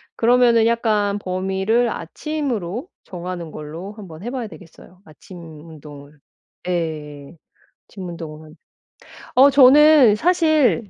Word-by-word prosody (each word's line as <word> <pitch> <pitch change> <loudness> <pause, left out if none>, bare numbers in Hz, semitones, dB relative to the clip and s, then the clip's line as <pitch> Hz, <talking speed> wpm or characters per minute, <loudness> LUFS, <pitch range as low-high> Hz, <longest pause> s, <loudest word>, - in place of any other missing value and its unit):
그러면은 235 -1 +3
약간 210 -3 0
범위를 190 +5 -1
아침으로 250 - -5 0.2
정하는 175 -2 -7
걸로 160 +6 -8
한번 185 -5 -12
해 240 - -4
봐야 250 -4 -5
되겠어요 180 -1 -16
아침 180 +4 -15 0.3
운동을. 145 -2 -14 0.5
예. 155 -3 -5 0.5
아침 190 -3 -9
운동은. 155 -2 -10 0.8
어 270 +2 +7
저는 280 -3 +6
사실 315 - +1
195 Hz, 235 characters per minute, -20 LUFS, 165-245 Hz, 0.8 s, 어